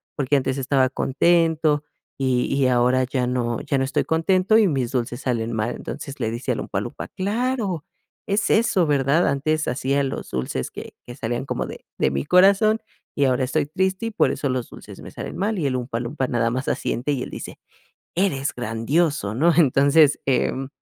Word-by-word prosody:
porque 145 0 +1
antes 135 0 0
estaba 135 -1 +2
contento, 155 +2 +2 0.3
y 130 -2 +1
y 140 -1 +2
ahora 125 +1 +3
ya 130 -1 -1
no 120 -2 -1
ya 140 - -1
no 135 - +1
estoy 135 - 0
contento 185 +6 +2
y 210 - +4
mis 135 -7 -1
dulces 125 0 -2
salen 115 -3 -1
mal". 110 +2 -1
Entonces, 140 -1 -7
le 110 - -1
dice 115 +3 -3
a - - 0
Oompa - - -3
Loompa: - - -6
"Claro, 205 - -2 0.4
es 205 0 0
eso, 215 -6 +3
¿verdad?. 145 +3 +2
Antes 150 +3 0
hacía 135 +3 0
los 135 - -4
dulces 65 0 -3
que - - -9
que 120 - -8
salían 120 +3 -3
como - - -2
de - - -10
de 65 - +1
mi 70 0 -2
corazón 200 +4 +4 0.3
y 145 - +2
ahora 130 0 +2
estoy 145 +4 0
triste 190 +7 -1
y - - -4
por 215 - +2
eso 140 - -2
los 125 -2 -2
dulces - - -12
me - - -10
salen - - -7
mal". 205 +2 -1
Y 160 - -1
el 135 -2 0
Oompa 120 -2 -3
Loompa 130 +2 -2
nada 115 -2 +1
más 130 +3 -3
asiente, 130 +5 -1
y 130 -3 -2
él - - -7
dice: - - -8 0.6
"Eres 150 -7 0
grandioso, 120 +1 0
¿no?". 165 +8 +3
Entonces, 145 -1 +4
em, 135 0 0
140 Hz, 195 wpm, -23 LUFS, 125-165 Hz, 0.6 s, y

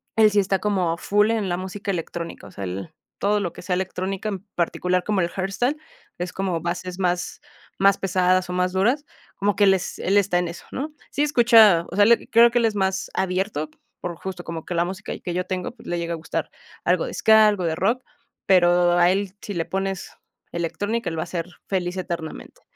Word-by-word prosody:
él 220 -1 +6
sí 205 - +3
está 195 -1 +1
como 185 -5 0
full 205 +4 +2
en 215 -5 -1
la 175 - 0
música 190 +3 -6
electrónica, 170 -1 -5
o - - -13
sea, 100 - -7
él 95 - -6 0.3
todo 210 +1 +2
lo 180 -4 -3
que - - -10
sea 180 - -1
electrónica, 190 +2 -3
en 195 -1 -5
particular 180 +1 0
como 205 -1 +1
el 170 - 0
hardstyle, 195 - -1 0.4
es 175 0 -3
como 190 -3 -1
bases 180 +2 -4
más 180 -1 -1 0.4
más 195 0 +5
pesadas 185 -1 +1
o - - -3
más 180 0 0
duras, 245 +10 +1 0.3
como 205 0 0
que 205 - +3
él 195 - +6
es 185 -2 -3
él 195 +2 +2
está 195 -3 +3
en 175 - -1
eso, 170 0 -9
¿no?, 295 +4 -4 0.2
sí 285 - -1
escucha, 225 - +6
o - - -5
sea, 205 +1 +6
él 235 +2 +3
creo 235 +1 +7
que, 240 - +2
él 235 - +2
es 220 -2 0
más 190 -1 -1
abierto, 185 -4 -1 0.3
por 175 -1 -4
justo 185 0 -6
como 165 -2 -6
que 180 - -4
la 170 - +3
música 190 +2 -5
que 175 - -5
yo 180 - -1
tengo, 185 -1 -3
pues, - - -15
le 175 - -1
llega 170 0 -2
a - - -3
gustar 160 - -4 0.4
algo - - +2
de - - -6
ska, 220 -1 +6
algo 205 -3 +1
de 160 -1 0
rock, 225 +9 0 0.4
pero 175 -1 +5
a 175 +1 +5
él 195 -1 -1
si 205 - -6
le 170 -3 -1
pones 195 -1 -3 0.4
electrónica, 175 +7 -2
él 165 - -5
va - - 0
a - - -8
ser 170 -2 -3 0.2
feliz 180 -1 -2
eternamente. 170 - -6
185 Hz, 220 wpm, -23 LUFS, 175-205 Hz, 0.4 s, creo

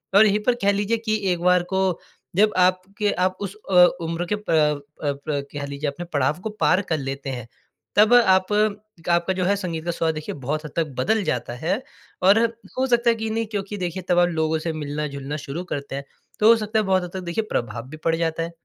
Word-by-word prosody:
और 210 +2 +8
यहीं 210 0 +3
पर 250 0 +3
कह 200 - +4
लीजिए 205 +3 0
कि 220 -1 -1 0.2
एक 175 - 0
बार 180 0 +4
को 190 -2 +1 0.4
जब 210 +2 +4
आपके 185 +3 +2
आप 185 +1 0
उस 200 0 -4 0.2
अ, 180 -1 +8 0.2
उम्र 165 +1 -2
के - - +3
प 210 - -11 0.5
अ, 145 - +1
प्र 140 +1 -3
कह 145 -1 -4
लीजिए 140 +1 -4
आपने 175 +5 -7
पड़ाव 145 +2 +1
को 220 - -2
पार 185 0 +4
कर 160 - +1
लेते 135 0 -4
हैं, 125 -3 -5 0.5
तब 215 +3 +6
आप 190 -5 +5
एक 210 -4 -1
आपका 170 +2 +2
जो 185 -1 -1
है 200 +2 +3
संगीत 170 -4 -4
का 175 - 0
स्वाद 165 -1 0
देखिए 155 -1 -5
बहुत 145 +3 -3
हद 150 - -7
तक 165 -2 +1
बदल 215 +10 +2
जाता 120 -5 -2
है 180 - -1 0.4
और 200 +4 +6 0.4
हो 260 - +2
सकता 240 -1 +3
है 230 - +3
कि 220 0 -3
नहीं 225 +1 -1
क्योंकि 205 0 -3
देखिए 180 0 -3
तब 175 -1 +4
लोगों 160 0 0
से 160 0 -3
मिलना-जुलना 145 -1 -4
शुरू 150 +4 -5
करते 140 -1 -5
हैं। 140 - -4 0.4
तो 215 - +5
हो 230 - +9
सकता 215 0 -1
है 215 - 0
बहुत 190 -1 +2
हद 175 - -7
तक 190 - -3
देखिए 170 +6 -1
प्रभाव 115 +1 -3
भी 155 - -9
पड़ 165 - +3
जाता 165 0 -1
है। 170 - -5
180 Hz, 230 wpm, -23 LUFS, 155-205 Hz, 0.5 s, हो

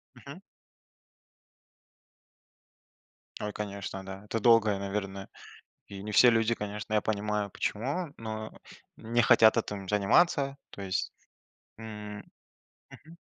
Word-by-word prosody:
Мгм. 140 +8 -11 3.0
Ой, 105 0 -3
конечно, 100 -2 -5
да. 95 +1 -8
Это 115 +2 -2
долго, 110 -2 +5
и, - - -5
наверное, 100 -1 -4 0.6
и 100 -1 -8
не 105 +1 -5
все 125 +2 +7
люди, 115 0 +2
конечно, 105 0 -6
я 105 - +4
понимаю 105 -1 -1
почему, 140 - -3
но 110 -1 -6 0.4
не 115 +2 0
хотят 110 +2 +6
этим 100 -4 -3
заниматься, 135 - +3
то 100 - -9
есть. 95 -1 -2 0.7
М, 105 -2 -7 0.7
мгм. 160 +3 -15
105 Hz, 115 wpm, -29 LUFS, 100-115 Hz, 3.0 s, все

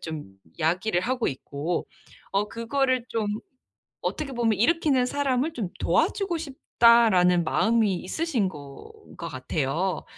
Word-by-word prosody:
좀 150 -12 -7 0.2
야기를 175 +4 +1
하고 245 +4 -1
있고 145 +5 -3 0.4
어 200 +2 +1
그거를 255 +2 0
좀 225 -2 -1 0.8
어떻게 285 -4 -3
보면 225 -4 +1
일으키는 275 -1 +3
사람을 280 +3 0
'좀 210 - -3
도와주고 385 -5 +1
싶다.'라는 230 - +4
마음이 220 +2 +2
있으신 230 - -1
건 150 - -13
것 170 - -6
같아요. 145 +6 -2
225 Hz, 265 characters per minute, -26 LUFS, 175-260 Hz, 0.8 s, 싶다.'라는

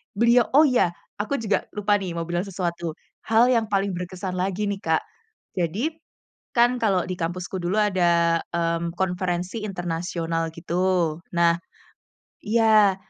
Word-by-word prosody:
beliau. 235 +2 +4
Oh 300 - +8
ya, 245 - +2 0.2
aku 215 +7 -1
juga 215 -6 -1
lupa 205 0 +2
nih, 180 -3 -5
mau 170 - -2
bilang 175 +3 -2
sesuatu 170 -3 -3 0.3
hal 230 +3 +5
yang 230 -3 +2
paling 200 -1 0
berkesan 180 +1 -5
lagi 190 +2 -1
nih, 200 -1 -2
Kak. 160 -3 +1 0.6
Jadi, 195 - 0 0.6
kan 245 +1 +4
kalau 195 -6 +2
di 185 - -4
kampusku 175 +2 -3
dulu 175 +3 -1
ada, 170 -5 +3 0.2
mmm, 170 0 -1
konferensi 180 +2 -2
internasional 165 -2 -2
gitu. 175 -1 0 0.2
Nah 170 0 +3 0.9
iya. 215 -3 +4
185 Hz, 135 wpm, -24 LUFS, 170-210 Hz, 0.9 s, Oh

